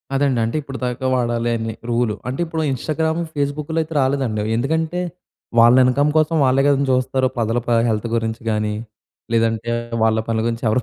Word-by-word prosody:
అదండీ! 135 -3 +2
అంటే 115 +4 -2
ఇప్పటిదాకా 130 -2 -4
వాడాలి 120 -1 0
అని 115 0 -4 0.2
రూలు. 120 -2 +1
అంటే, 130 +2 -4
ఇప్పుడు 160 -1 -3
ఇన్‌స్టాగ్రాము 160 +5 -1
ఫేస్‌బుక్‌లో 145 +2 -2
అయితే 160 +1 -6
రాలేదండి 130 -5 0
అవి. 110 - -2
ఎందుకంటే, 160 +7 -1 0.6
వాళ్ళ 120 +1 +7
ఇన్కమ్ 140 +4 +2
కోసం 155 +1 +2
వాళ్ళే 130 +1 +3
కదండీ 140 -1 +2
చూస్తారు. 130 +1 +1
ప్రజల 115 0 0
ప - - -2 0.2
హెల్త్ 110 +1 -1
గురించి 110 -1 -2
గాని, 105 -1 0 0.6
లేదంటే 115 0 +1 0.3
వాళ్ళ 110 0 +3
పనుల 115 -1 0
గురించి 115 0 -3
ఎవరు 110 +3 +2
125 Hz, 165 wpm, -20 LUFS, 115-145 Hz, 0.6 s, వాళ్ళ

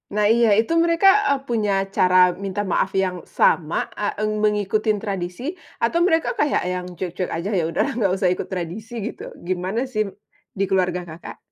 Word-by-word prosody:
Nah, 210 - +2
iya, 235 0 +4
itu 225 - 0
mereka, 335 +3 +3 0.2
eee, 280 -1 +2
punya 220 -4 0 0.2
cara 180 0 +5
minta 195 +1 -2
maaf 190 0 0
yang 185 -2 -1
sama, 160 -2 +1
eee, 205 -1 -2
eng 215 - +1
mengikuti 210 0 +1 0.2
tradisi 195 - -3 0.3
atau 235 +9 +2
mereka 325 -2 +2
kayak 295 - +2
yang 180 0 -3
cuek-cuek 180 +1 -3
aja, 170 +4 -3
ya - - 0
udahlah 165 - 0
nggak 195 -5 +2
usah 190 -2 +2
ikut 180 - -3
tradisi, 190 +5 -6
gitu. - - -8 0.2
Gimana 185 +6 -1
sim 215 -6 -1 0.5
di 195 - 0
keluarga 180 -2 0
Kakak? 170 0 -10
195 Hz, 170 wpm, -22 LUFS, 180-220 Hz, 0.5 s, cara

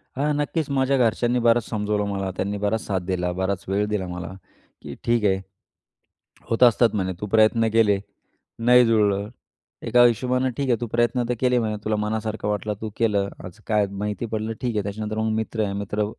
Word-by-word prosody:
हां, 145 +3 0
नक्कीच 150 +1 -1
माझ्या 135 0 +1
घरच्यांनी 120 0 +2
बरंच 120 0 +3
समजावलं 105 -1 -1
मला. 95 -1 -2
त्यांनी 100 +2 -2
बराच 105 +2 -1
साथ 95 -2 -1
दिला, 90 -1 -1
बराच 95 +1 -2
वेळ 100 +2 +1
दिला 105 -3 -2
मला, 90 0 -6 0.5
की - - -8
"ठीक 115 -2 +1
आहे, 95 -1 +2 1.1
होत 115 - +2
असतात." 120 -1 +5
म्हणे, 95 -2 -1
"तू 105 - -3
प्रयत्न 110 +2 +3
केले, 105 -3 +4 0.6
नाही 125 +1 +6
जुळलं. 105 -3 +2 0.6
एका 120 0 +5
हिशोबाने 125 +2 +1
ठीक 140 - -1
आहे 120 - +4
तू 120 - -2
प्रयत्न 120 +1 +2
तर - - +2
केले" 125 -1 +2
म्हणे, 110 -2 -2
"तुला 110 - +1
मनासारखं 110 0 -2
वाटलं 105 +1 -1
तू 110 - -3
केलं. 105 -4 +1 0.2
आज 90 +4 -11
काय 105 -2 +2
माहिती 105 +3 -3
पडलं 110 +1 -2
ठीक 120 -3 -2
आहे." 105 - 0
त्याच्यानंतर 105 +2 -4
मग 110 0 0
मित्र 110 0 -2
आहे. 100 -1 -2
मित्र 100 +1 -2
110 Hz, 190 wpm, -23 LUFS, 100-120 Hz, 1.1 s, नाही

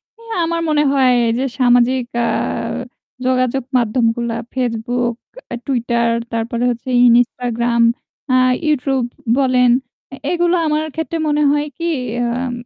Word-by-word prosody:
এ 460 - -27 0.2
আমার 335 0 -1
মনে 300 -1 +3
হয় 260 -2 +4 0.2
যে 260 - -1 0.2
সামাজিক 245 0 +3 0.2
অ্যাঁ 230 -1 -1 0.5
যোগাযোগ 255 0 +1
মাধ্যমগুলা 235 0 0 0.2
Facebook, 240 -1 -1 0.5
Tweeter, 235 -3 0 0.3
তারপরে 230 +1 -2
হচ্ছে 240 +2 -4 0.2
Instagram, 235 0 +1 0.5
অ্যাঁ 255 0 +4 0.2
YouTube 270 -4 0 0.3
বলেন 255 -2 +3 0.4
এ - - -5 0.2
এগুলা 350 0 +2
আমার 305 +1 0
ক্ষেত্রে 320 +1 -3
মনে 300 0 +1
হয় 295 +1 0
কি 340 0 -1 0.3
অ্যাঁম 245 +1 -1
250 Hz, 120 wpm, -18 LUFS, 235-275 Hz, 0.5 s, হয়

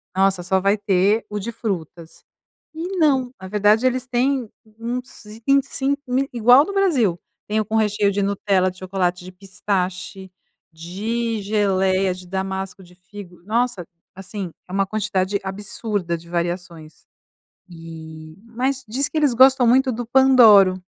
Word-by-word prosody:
"Nossa 190 -1 +2
só 190 +1 +1
vai 200 +2 +2
ter 200 +2 +1
o 210 - -3
de 220 +4 -5
frutas." 175 -7 -6 0.5
E 355 +4 -5
não. 270 -6 +2
Na 190 - -7
verdade 210 +4 +3
eles 255 0 -1
têm 255 0 0 0.3
uns 245 +2 -6 0.2
25 275 +1 +1
mil 260 +2 0
igual 245 +2 +6
ao 290 - +4
do 400 - -6
Brasil, 270 - +1 0.3
tem 215 +1 0
o 215 - -1
com 215 - -4
recheio 210 -2 +2
de 200 +1 -1
Nutella, 195 -1 +1
de 185 - -13
chocolate, 180 -1 -2
de 185 - -9
pistache, 190 -1 -4 0.4
de 215 +7 -3
geléia, 195 -2 +1
de 180 0 -12
damasco, 190 0 -4
de 180 0 -18
figo. 180 -1 -13
Nossa! 235 -2 -1 0.3
Assim, 190 -1 -7 0.2
é - - -13
uma 195 +1 +1
quantidade 195 -1 -1
absurda 195 -2 -4
de 170 +1 -16
variações. 170 -2 -5 0.6
E 160 -2 -11
mas 255 +4 -3
diz 265 +6 -1
que - - -15
eles 295 -5 +2
gostam 260 +1 +5
muito 260 +3 +3
do 240 +2 -5
Pandoro, 230 -7 +6
200 Hz, 150 wpm, -21 LUFS, 185-245 Hz, 0.6 s, igual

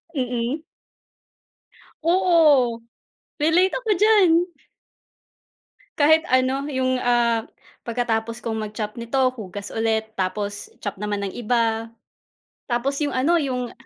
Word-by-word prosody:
Mm. 250 +3 -2 1.4
Oo. 320 -9 +4 0.6
Relate 330 +5 +3
ako 485 -3 -4
diyan. 415 -2 +5 1.7
Kahit 315 +2 +5
ano 260 +2 +1
yung, 260 -2 0
ah, 235 -2 +2 0.4
pagkatapos 230 -1 -2
kong 220 -1 -2
mag-chop 210 0 -5
nito, 235 +3 -3 0.2
hugas 205 -4 -8
ulit, 220 -1 -1
tapos 205 +2 -3
chop 200 -2 -4
naman 205 -1 -2
ng 195 - -5
iba, 230 -1 0 0.8
tapos 270 +4 -1
yung 290 -2 -1
ano, 315 +7 +3
yung 250 -4 -3
245 Hz, 105 wpm, -23 LUFS, 225-290 Hz, 1.7 s, diyan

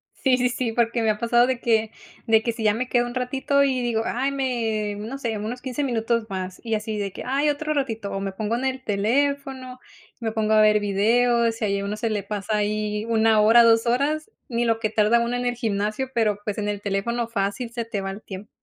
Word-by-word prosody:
Sí, 260 -2 +2
sí, 250 0 +2
sí, 245 -1 -2
porque 235 0 +1
me 220 - +2
ha 210 - -3
pasado 240 +2 +3
de 255 -2 -2
que 220 -2 +1 0.4
de 220 -1 +4
que 235 - 0
si 230 -1 -6
ya 210 - +4
me 250 +3 -3
quedo 240 -1 +2
un 240 - -8
ratito 265 +3 +1
y 260 -2 +1
digo: 235 -2 0
"Ay, 265 +3 -1
me 225 -6 -1
no 230 +6 -5
sé, 230 -5 -3
unos 225 +4 -5
15 260 +2 -3
minutos 230 -3 0
más" 185 -1 -5
y 225 -2 -1
así 215 0 -3
de 200 -1 -3
que: - - -7
"Ay, 280 +4 +1
otro 305 +1 -1
ratito" 225 -7 -2
o 195 - -3
me 195 -1 -4
pongo 215 +3 -2
en 250 +3 -2
el 260 0 -2
teléfono, 260 +4 -1 0.4
me 225 -2 -3
pongo 220 -1 +1
a 215 - +6
ver 210 0 +4
videos 230 +3 +2
y - - +2
ahí 200 -1 0
a 200 - -4
uno 205 +1 -3
se 225 +1 -2
le 205 -3 -2
pasa 210 +1 -2
ahí 210 0 -1
1 225 -1 +3
hora, 225 +3 +7
2 225 0 +4
horas 290 - 0 0.2
ni 240 -1 0
lo 225 -1 +1
que 220 -1 -1
tarda 215 +2 +3
uno 235 +1 -1
en 245 - -3
el 245 - 0
gimnasio, 215 +2 -2
pero 215 -3 +1
pues 210 -1 -3
en 210 -1 -2
el 205 -1 -3
teléfono 225 +4 -1
fácil 230 +2 -2
se 235 -1 -4
te 210 -3 -3
va 195 - -3
el 200 +2 -9
tiempo. 195 0 -9
225 Hz, 245 wpm, -24 LUFS, 210-245 Hz, 0.4 s, hora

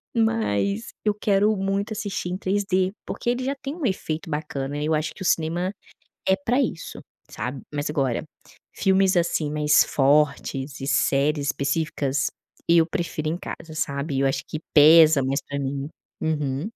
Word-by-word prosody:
mas 220 - 0 0.2
eu 210 - +3
quero 210 +1 +2
muito 195 +3 -1
assistir 205 -4 -3
em 180 - -2
3D, 190 -1 0
porque 240 - -3
ele 245 +1 0
já 275 +2 -1
tem 275 +2 -6
um 335 - -7
efeito 165 -5 -2
bacana. 145 -2 -3
E 150 - -2
eu 155 - +1
acho 155 +1 0
que 190 - -9
o - - -5
cinema 175 +4 0 0.6
é 190 - +5
para 240 +7 0
isso, 230 -11 -3 0.3
sabe. 130 +1 -5
Mas, 145 0 -2
agora, 135 -6 0 0.5
filmes, 190 -1 +3
assim, 170 -3 +1
mais 150 0 +4
fortes 140 -1 +1
e - - -3
séries 140 +1 +2
específicas, 140 -1 0 0.4
eu 170 -1 +6
prefiro 170 -4 -3
em 165 +3 -2
casa, 165 -3 -8
sabe. 140 -1 -2
Eu 135 - +2
acho 135 - 0
que 155 - -5
pesa 155 -1 +8
mais 135 +2 0
para 140 0 -3
mim. 140 +1 -3 0.3
Uhum. 150 -1 -1
160 Hz, 165 wpm, -24 LUFS, 140-195 Hz, 0.6 s, pesa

